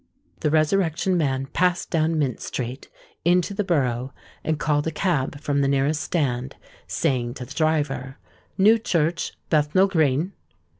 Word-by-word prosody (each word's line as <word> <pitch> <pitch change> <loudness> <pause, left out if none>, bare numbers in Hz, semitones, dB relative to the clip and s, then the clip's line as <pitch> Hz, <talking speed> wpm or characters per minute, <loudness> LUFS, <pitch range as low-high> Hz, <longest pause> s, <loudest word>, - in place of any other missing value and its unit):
The - - +1
Resurrection 165 +3 +2
Man 135 -5 0
passed 180 +5 0
down 160 -1 +1
Mint 135 -6 0
Street, 125 +1 -5 0.3
into 180 +3 +2
the 205 +1 -1
Borough, 130 -7 0 0.3
and 160 -1 0
called 150 0 0
a - - 0
cab 150 -5 -1
from 145 -1 0
the 140 - +2
nearest 140 +3 +1
stand, 135 -6 -1 0.3
saying 125 -6 -1
to 125 - -6
the 120 - -10
driver, 145 -4 0 0.4
"New 215 +4 +5
Church, 170 -5 0 0.2
Bethnal 155 +4 +4
Green." 160 0 +1
150 Hz, 145 wpm, -24 LUFS, 135-170 Hz, 0.4 s, New